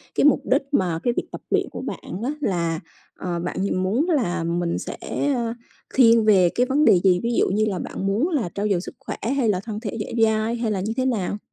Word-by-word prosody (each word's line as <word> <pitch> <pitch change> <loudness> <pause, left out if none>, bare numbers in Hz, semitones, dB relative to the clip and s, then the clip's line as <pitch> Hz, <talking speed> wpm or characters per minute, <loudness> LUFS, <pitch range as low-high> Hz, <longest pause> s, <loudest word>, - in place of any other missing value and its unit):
cái - - +3
mục 295 - +5
đích 265 +3 +2
mà 175 - +1
cái 240 - +1
việc - - 0
tập - - -7
luyện - - +1
của - - -6
bạn 185 - -6
á, 265 - 0
là 170 - 0 0.4
ờ, 175 -1 -3
bạn 175 +1 -4
nh 185 -2 0
muốn 250 - +1
là 180 - +1
mình 170 0 -1
sẽ, - - -6 0.4
ơ, 235 -2 -1 0.4
thiên 230 -3 +6
về 190 -5 +5
cái 250 - +3
vấn 285 +4 +2
đề 180 - +6
gì? 180 -2 +4
Ví 235 0 0
dụ - - +3
như 215 +3 +2
là 195 -4 -2
bạn 195 - -4
muốn 220 - +1
là 270 - -1
trau 205 +1 0
dồi 180 -3 +1
sức - - -9
khỏe 270 - -6 0.2
hay 235 -5 +2
là 185 -3 +1
thân 210 +1 -6
thể 220 -1 -5
dẻo 210 - -4
dai 220 +1 0
hay 230 -2 -1
là 195 - -1
như 215 +3 -2
thế 260 - +1
nào? 210 -5 -1
210 Hz, 250 wpm, -23 LUFS, 185-240 Hz, 0.4 s, thiên